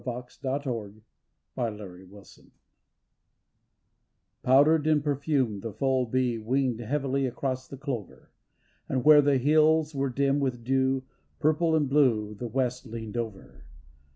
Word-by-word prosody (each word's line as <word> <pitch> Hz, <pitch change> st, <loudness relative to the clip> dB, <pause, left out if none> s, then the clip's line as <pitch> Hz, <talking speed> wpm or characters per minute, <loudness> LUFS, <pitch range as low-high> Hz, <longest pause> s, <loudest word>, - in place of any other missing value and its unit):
280 125 Hz, -3 st, -5 dB, 0.5 s
THE -, -, -4 dB
LANAWN 100 Hz, -3 st, -7 dB
SHEE -, -, -20 dB, 1.9 s
Powdered 145 Hz, +4 st, +4 dB
and 150 Hz, -2 st, +3 dB
perfumed 140 Hz, -7 st, 0 dB
the 115 Hz, -, -5 dB
full 130 Hz, +2 st, 0 dB
bee 125 Hz, -1 st, 0 dB
Winged 125 Hz, +1 st, 0 dB
heavily 135 Hz, +2 st, -1 dB
across 130 Hz, +1 st, -4 dB
the 135 Hz, -, -9 dB
clover, 130 Hz, -7 st, -6 dB, 0.6 s
And 130 Hz, -2 st, -1 dB
where 150 Hz, -1 st, +8 dB
the 140 Hz, -1 st, +3 dB
hills 155 Hz, +3 st, +3 dB
were 135 Hz, -1 st, -1 dB
dim 140 Hz, +2 st, +1 dB
with 130 Hz, -4 st, -2 dB
dew, 130 Hz, +1 st, +1 dB, 0.4 s
Purple 160 Hz, +2 st, +2 dB
and 150 Hz, -3 st, +2 dB
blue 120 Hz, -7 st, +2 dB
the 120 Hz, +3 st, -6 dB
west 125 Hz, +1 st, -2 dB
leaned 110 Hz, -1 st, -7 dB
over. 100 Hz, -, -6 dB
130 Hz, 125 wpm, -27 LUFS, 115-140 Hz, 1.9 s, where